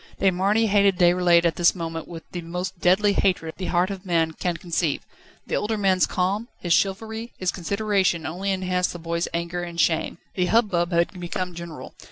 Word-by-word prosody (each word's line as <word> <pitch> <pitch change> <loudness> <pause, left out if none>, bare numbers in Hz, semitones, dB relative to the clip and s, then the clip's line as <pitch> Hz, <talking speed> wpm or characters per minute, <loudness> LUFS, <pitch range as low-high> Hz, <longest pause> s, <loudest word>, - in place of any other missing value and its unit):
De 195 - +4
Marny 200 +5 +2
hated 200 -2 +3
Déroulède 175 -1 +4
at 165 - +1
this 175 +1 +4
moment 165 -2 -5
with 165 -2 -8
the 175 - -4
most 180 +2 -5
deadly 200 +4 +4
hatred 180 -5 +1
the 185 - -4
heart 180 +2 +1
of 195 -1 -6
man 165 -4 +1
can 170 +1 -2
conceive. 165 -3 -1 0.4
The - - -6
older 215 +1 -1
man's 190 -3 +3
calm, 195 +5 -1
his 175 -2 0
chivalry, 220 +5 -1
his 185 -1 0
consideration 195 -2 0
only 185 +5 -3
enhanced 185 -1 0
the - - -6
boy's 170 0 -2
anger 170 +1 -3
and 170 -1 -6
shame. 165 0 +1 0.2
The 180 -1 0
hubbub 185 -5 +2
had 170 +2 +1
become 180 +1 -4
general. 170 -2 -8
180 Hz, 190 wpm, -24 LUFS, 170-195 Hz, 0.4 s, De